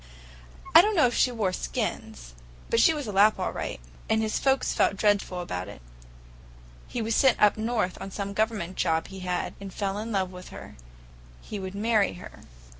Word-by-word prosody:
"I -, -, +11 dB
don't 420 Hz, +3 st, 0 dB
know 315 Hz, -, +5 dB
if 240 Hz, -, +1 dB
she 250 Hz, -, +3 dB
wore 210 Hz, -6 st, -1 dB
skins, -, -, -4 dB, 0.4 s
but 230 Hz, -, +3 dB
she 280 Hz, -, +6 dB
was 300 Hz, -3 st, -3 dB
a 210 Hz, -, -4 dB
Lapp 205 Hz, +2 st, +4 dB
all 185 Hz, -, -2 dB
right, -, -, -5 dB, 0.3 s
and 220 Hz, -, +3 dB
his 215 Hz, -, -1 dB
folks 270 Hz, -1 st, +1 dB
felt -, -, +2 dB
dreadful 200 Hz, -3 st, +1 dB
about 90 Hz, -, -5 dB
it. -, -, -10 dB, 1.1 s
He 240 Hz, -, -3 dB
was 225 Hz, +1 st, -1 dB
sent 265 Hz, +2 st, +4 dB
up 210 Hz, -, +5 dB
north 220 Hz, -4 st, -1 dB
on -, -, -5 dB
some 200 Hz, 0 st, -5 dB
Government 215 Hz, -4 st, -1 dB
job 160 Hz, 0 st, 0 dB
he 190 Hz, 0 st, -9 dB
had, 180 Hz, -1 st, -3 dB
and 195 Hz, -1 st, -7 dB
fell 195 Hz, +1 st, -3 dB
in 225 Hz, +2 st, -5 dB, 0.2 s
with 180 Hz, 0 st, -10 dB
her. -, -, -11 dB, 0.7 s
He 210 Hz, -, -6 dB
would 190 Hz, 0 st, -6 dB
marry 215 Hz, -1 st, +2 dB
her." 180 Hz, -, -11 dB
205 Hz, 190 wpm, -27 LUFS, 185-230 Hz, 1.1 s, I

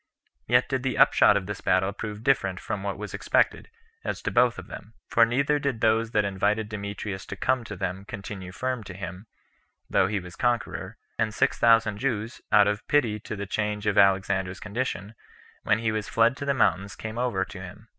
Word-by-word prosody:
Yet 120 Hz, -, +4 dB
did 130 Hz, -2 st, -1 dB
the 130 Hz, -3 st, -2 dB
upshot 100 Hz, -, +6 dB
of 95 Hz, -, -3 dB
this 105 Hz, 0 st, -6 dB
battle 95 Hz, +2 st, +2 dB
prove 105 Hz, 0 st, -6 dB
different 95 Hz, -9 st, +1 dB
from 100 Hz, -, -4 dB
what 100 Hz, 0 st, -3 dB
was 105 Hz, +1 st, -7 dB
expected, -, -, +1 dB, 0.3 s
as -, -, -4 dB
to -, -, -1 dB
both 120 Hz, -1 st, +3 dB
of -, -, -7 dB
them; 110 Hz, +3 st, -11 dB
for 115 Hz, 0 st, +4 dB
neither 140 Hz, +5 st, +1 dB
did 140 Hz, -5 st, -2 dB
those 115 Hz, +1 st, +2 dB
that 105 Hz, -2 st, +1 dB
invited 105 Hz, +2 st, 0 dB
Demetrius 100 Hz, -2 st, -5 dB
to -, -, -5 dB
come 130 Hz, -2 st, 0 dB
to 105 Hz, -, -6 dB
them 95 Hz, +1 st, -4 dB
continue 100 Hz, -4 st, -7 dB
firm 125 Hz, +3 st, -3 dB
to 95 Hz, -, -8 dB
him, 95 Hz, +3 st, -7 dB, 0.6 s
though 95 Hz, -, +4 dB
he 105 Hz, 0 st, -1 dB
was 90 Hz, -1 st, -10 dB
conqueror; 115 Hz, -4 st, -1 dB, 0.2 s
and 110 Hz, -2 st, 0 dB
six -, -, +1 dB
thousand 115 Hz, -3 st, +4 dB
Jews, 115 Hz, -3 st, -2 dB
out 105 Hz, -1 st, +6 dB
of 105 Hz, 0 st, -2 dB
pity 120 Hz, -8 st, +2 dB
to 105 Hz, -, -6 dB
the 100 Hz, 0 st, -4 dB
change 105 Hz, +1 st, -2 dB
of 105 Hz, -2 st, +1 dB
Alexander's 95 Hz, -1 st, +2 dB
condition, 105 Hz, -2 st, -4 dB, 0.5 s
when 105 Hz, -, +2 dB
he 110 Hz, -1 st, 0 dB
was 110 Hz, -1 st, -3 dB
fled 115 Hz, +2 st, +3 dB
to 140 Hz, -, -5 dB
the 140 Hz, -1 st, +1 dB
mountains, 100 Hz, -5 st, +1 dB
came 110 Hz, +1 st, -6 dB
over 120 Hz, -7 st, 0 dB
to 100 Hz, -2 st, -10 dB
him. 100 Hz, +4 st, -11 dB
105 Hz, 205 wpm, -26 LUFS, 100-115 Hz, 0.6 s, upshot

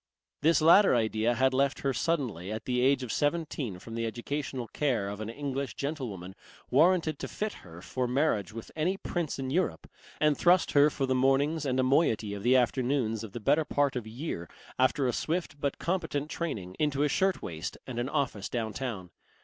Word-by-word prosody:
This 160 Hz, -1 st, +4 dB
latter 180 Hz, +1 st, +7 dB
idea 110 Hz, +1 st, +1 dB
had 130 Hz, +2 st, +2 dB
reft 135 Hz, +1 st, +1 dB
her 135 Hz, -1 st, 0 dB
suddenly 120 Hz, -, -1 dB
at 110 Hz, 0 st, -5 dB
the 125 Hz, -1 st, 0 dB
age 135 Hz, 0 st, +3 dB
of 120 Hz, -, -4 dB
seventeen 145 Hz, -, -1 dB
from 115 Hz, +5 st, -10 dB
the 115 Hz, 0 st, -1 dB
educational 125 Hz, +2 st, -4 dB
care 120 Hz, -6 st, 0 dB
of 100 Hz, +1 st, -5 dB
an 110 Hz, -, -4 dB
English 140 Hz, +1 st, -4 dB
gentlewoman 120 Hz, -, -4 dB, 0.4 s
warranted 165 Hz, -4 st, +3 dB
to -, -, -4 dB
fit 215 Hz, 0 st, -3 dB
her 85 Hz, -1 st, -12 dB
for 130 Hz, -1 st, -2 dB
marriage 125 Hz, -, +1 dB
with 115 Hz, +1 st, -9 dB
any 175 Hz, +5 st, 0 dB
prince 175 Hz, -5 st, -3 dB
in 130 Hz, -1 st, -3 dB
Europe, 180 Hz, +4 st, 0 dB, 0.3 s
and 150 Hz, -1 st, +3 dB
thrust 175 Hz, +3 st, +4 dB
her 145 Hz, +1 st, +6 dB
for 140 Hz, -, -2 dB
the 130 Hz, -, +1 dB
mornings 140 Hz, +4 st, +2 dB
and 130 Hz, 0 st, 0 dB
a -, -, +3 dB
moiety 130 Hz, -7 st, +2 dB
of 100 Hz, -, -5 dB
the 125 Hz, +4 st, +4 dB
afternoons 125 Hz, -2 st, +1 dB
of 105 Hz, -3 st, -8 dB
the -, -, -4 dB
better 150 Hz, +8 st, +3 dB
part 145 Hz, -2 st, 0 dB
of 120 Hz, -3 st, -4 dB
a -, -, -7 dB
year, 115 Hz, -, -5 dB, 0.3 s
after 130 Hz, +1 st, +3 dB
a 125 Hz, -, 0 dB
swift 160 Hz, -3 st, -2 dB
but 140 Hz, -1 st, -1 dB
competent 160 Hz, -5 st, -2 dB
training, 100 Hz, -, -4 dB
into 145 Hz, -2 st, +1 dB
a -, -, +4 dB
shirt 190 Hz, +6 st, +1 dB
waist 80 Hz, 0 st, -5 dB
and 125 Hz, -2 st, -5 dB
an 120 Hz, +2 st, -1 dB
office 115 Hz, -8 st, -1 dB
down 110 Hz, -3 st, -2 dB
town. 105 Hz, -10 st, -5 dB
130 Hz, 200 wpm, -29 LUFS, 115-150 Hz, 0.4 s, latter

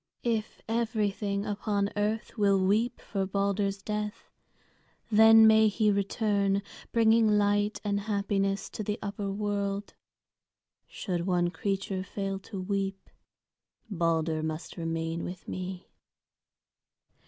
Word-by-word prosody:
If 225 Hz, -3 st, -2 dB
everything 210 Hz, -3 st, -1 dB
upon 205 Hz, -1 st, -1 dB
earth 210 Hz, +2 st, -1 dB
will 200 Hz, -2 st, +3 dB
weep 215 Hz, +6 st, +1 dB
for 195 Hz, -2 st, -3 dB
Balder's 200 Hz, 0 st, -1 dB
death, 210 Hz, 0 st, -4 dB, 0.8 s
then 220 Hz, +1 st, +8 dB
may 220 Hz, 0 st, +6 dB
he 210 Hz, 0 st, +2 dB
return, 200 Hz, 0 st, +1 dB, 0.3 s
bringing 225 Hz, -2 st, +4 dB
light 205 Hz, +1 st, +1 dB
and 200 Hz, -1 st, 0 dB
happiness 200 Hz, -1 st, -1 dB
to -, -, -5 dB
the 210 Hz, +1 st, -2 dB
upper 200 Hz, 0 st, -3 dB
world. 200 Hz, 0 st, -2 dB, 0.9 s
Should 175 Hz, -3 st, -3 dB
one 175 Hz, -1 st, +2 dB
creature 195 Hz, -1 st, -2 dB
fail 195 Hz, 0 st, -4 dB
to 195 Hz, -, -5 dB
weep, 195 Hz, 0 st, -3 dB, 0.8 s
Balder 165 Hz, -3 st, 0 dB
must 155 Hz, +1 st, -5 dB
remain 165 Hz, 0 st, -3 dB
with 180 Hz, 0 st, -7 dB
me." 185 Hz, 0 st, -5 dB
200 Hz, 110 wpm, -29 LUFS, 195-210 Hz, 0.9 s, then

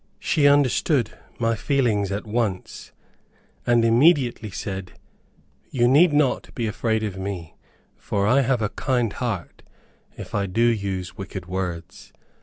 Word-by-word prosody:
She 145 Hz, -2 st, +2 dB
understood 140 Hz, -3 st, +3 dB, 0.3 s
my 115 Hz, -1 st, +1 dB
feelings 110 Hz, -6 st, 0 dB
at 100 Hz, +3 st, -3 dB
once, 110 Hz, -4 st, -3 dB, 0.8 s
and 120 Hz, -1 st, +4 dB
immediately 120 Hz, -2 st, +3 dB
said, 95 Hz, -1 st, -6 dB, 0.8 s
"You 120 Hz, -2 st, +2 dB
need 150 Hz, +7 st, +5 dB
not 145 Hz, -3 st, +1 dB
be 120 Hz, -, -2 dB
afraid 110 Hz, 0 st, -1 dB
of 100 Hz, -3 st, -4 dB
me, 95 Hz, -4 st, -5 dB, 0.4 s
for 100 Hz, -1 st, -1 dB
I 130 Hz, +6 st, +4 dB
have 125 Hz, -3 st, +1 dB
a 105 Hz, -, 0 dB
kind 120 Hz, -3 st, -1 dB
heart, 110 Hz, -8 st, -4 dB, 0.6 s
if -, -, -9 dB
I 100 Hz, -1 st, 0 dB
do 115 Hz, +6 st, 0 dB
use 100 Hz, -4 st, -1 dB
wicked 95 Hz, -2 st, -6 dB
words. 90 Hz, -2 st, -5 dB
110 Hz, 135 wpm, -23 LUFS, 100-125 Hz, 0.8 s, need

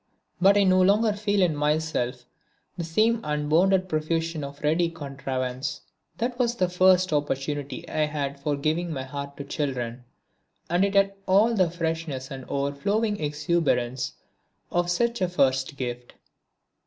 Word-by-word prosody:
But 200 Hz, +2 st, +6 dB
I 200 Hz, -, +5 dB
no 185 Hz, -1 st, +4 dB
longer 210 Hz, +3 st, +4 dB
feel 205 Hz, -1 st, +1 dB
in 165 Hz, -4 st, +2 dB
myself 150 Hz, -5 st, -1 dB, 0.5 s
the 175 Hz, -, -4 dB
same 220 Hz, +8 st, +2 dB
unbounded 165 Hz, +6 st, +2 dB
profusion 160 Hz, -1 st, -1 dB
of 140 Hz, +1 st, -8 dB
ready 165 Hz, +3 st, +2 dB
contrivance. 135 Hz, -3 st, -4 dB, 0.4 s
That 240 Hz, +2 st, -2 dB
was 240 Hz, -1 st, +1 dB
the 185 Hz, -6 st, +1 dB
first 185 Hz, -1 st, +4 dB
opportunity 145 Hz, -1 st, -2 dB
I 155 Hz, -, +1 dB
had 140 Hz, -2 st, -3 dB
for 145 Hz, +1 st, -1 dB
giving 160 Hz, +4 st, -1 dB
my 135 Hz, -4 st, -3 dB
heart 140 Hz, +1 st, -7 dB
to 140 Hz, -, -5 dB
children, 130 Hz, -4 st, -3 dB, 0.7 s
and 175 Hz, +2 st, +3 dB
it 200 Hz, 0 st, 0 dB
had 195 Hz, 0 st, +4 dB
all 210 Hz, +5 st, +4 dB
the 185 Hz, -6 st, +3 dB
freshness 160 Hz, -5 st, -3 dB
and 130 Hz, -2 st, -7 dB
overflowing 200 Hz, +11 st, 0 dB
exuberance 150 Hz, -5 st, 0 dB, 0.6 s
of 175 Hz, 0 st, +1 dB
such 235 Hz, +6 st, 0 dB
a 185 Hz, -, +2 dB
first 135 Hz, -3 st, +1 dB
gift. 125 Hz, -1 st, -5 dB
155 Hz, 145 wpm, -26 LUFS, 140-185 Hz, 0.7 s, But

